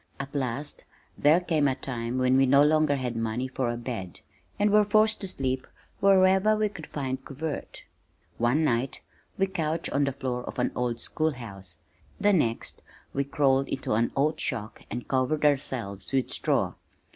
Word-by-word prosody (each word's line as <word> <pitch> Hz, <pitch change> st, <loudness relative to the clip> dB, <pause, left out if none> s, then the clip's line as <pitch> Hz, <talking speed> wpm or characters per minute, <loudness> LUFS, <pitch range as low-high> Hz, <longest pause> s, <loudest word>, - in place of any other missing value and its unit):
At 140 Hz, 0 st, -6 dB
last 140 Hz, +1 st, -3 dB, 0.3 s
there 150 Hz, +4 st, +5 dB
came 160 Hz, -5 st, +1 dB
a 130 Hz, -, +1 dB
time 120 Hz, -2 st, -4 dB
when 130 Hz, 0 st, +3 dB
we 135 Hz, 0 st, +5 dB
no 140 Hz, +2 st, +6 dB
longer 155 Hz, -1 st, +3 dB
had 125 Hz, -3 st, -3 dB
money 115 Hz, +3 st, -1 dB
for 130 Hz, -1 st, -2 dB
a 120 Hz, -, -2 dB
bed, 115 Hz, -7 st, -6 dB, 0.4 s
and 205 Hz, 0 st, +2 dB
were 210 Hz, 0 st, +6 dB
forced 215 Hz, +1 st, +3 dB
to 195 Hz, -, -3 dB
sleep 130 Hz, -6 st, -2 dB, 0.3 s
wherever 190 Hz, +2 st, +5 dB
we 215 Hz, 0 st, +1 dB
could 165 Hz, -6 st, -9 dB
find 130 Hz, -2 st, -4 dB
covert. 145 Hz, +3 st, -6 dB, 0.5 s
One 120 Hz, +7 st, +2 dB
night 125 Hz, -2 st, 0 dB, 0.3 s
we 195 Hz, -, +3 dB
couched 165 Hz, -4 st, -2 dB
on 140 Hz, 0 st, +2 dB
the 140 Hz, -, 0 dB
floor 130 Hz, -2 st, -3 dB
of -, -, -7 dB
an 125 Hz, -, +1 dB
old 120 Hz, -1 st, -1 dB
school 155 Hz, +6 st, -1 dB
house, 95 Hz, -, -8 dB, 0.4 s
the 205 Hz, 0 st, +4 dB
next 115 Hz, -10 st, 0 dB, 0.3 s
we 140 Hz, -, +1 dB
crawled 135 Hz, -1 st, +2 dB
into 130 Hz, -, -2 dB
an 115 Hz, +2 st, +2 dB
oat 155 Hz, +3 st, +1 dB
shock 110 Hz, -4 st, -3 dB
and 120 Hz, +3 st, -5 dB
covered 135 Hz, +3 st, +1 dB
ourselves 115 Hz, -9 st, -1 dB
with 130 Hz, -2 st, +1 dB
straw. -, -, +1 dB
135 Hz, 175 wpm, -27 LUFS, 125-155 Hz, 0.5 s, no